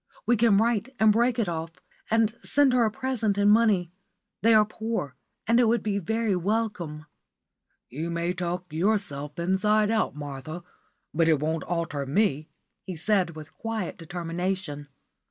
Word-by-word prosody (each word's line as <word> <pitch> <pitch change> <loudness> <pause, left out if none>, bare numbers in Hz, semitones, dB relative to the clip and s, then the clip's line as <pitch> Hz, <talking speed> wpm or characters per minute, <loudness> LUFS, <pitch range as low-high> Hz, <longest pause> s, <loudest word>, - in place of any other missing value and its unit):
We 240 - +4
can 225 -2 +4
write 230 +3 +1
and 220 -1 +6
break 235 +3 +2
it 230 -5 +1
off, 165 -1 -4 0.4
and 225 -1 +2
send 285 -2 +3
her 245 -2 +4
a - - +2
present 235 -4 -1
in 205 0 +4
money. 210 -6 +3 0.5
They 225 +1 +5
are 215 -1 +6
poor, 215 - -4 0.3
and 230 +3 +3
it 240 - +4
would 235 +1 +2
be 200 -2 0
very 220 +2 0
welcome." 180 -6 -2 0.8
"You 155 +6 -5
may 170 +1 -1
talk 180 -1 -4
yourself 160 -6 -1
inside 205 +5 +2
out, 220 -8 0
Martha, 145 +3 -7 0.5
but 165 +1 +2
it 155 -3 +4
won't 160 +2 -2
alter 165 -5 -2
me," 155 -2 +1 0.3
he 185 - -7
said, 180 -1 +1
with 155 -1 -10
quiet 225 -5 -4
determination. 170 -2 -4
190 Hz, 155 wpm, -26 LUFS, 165-220 Hz, 0.8 s, and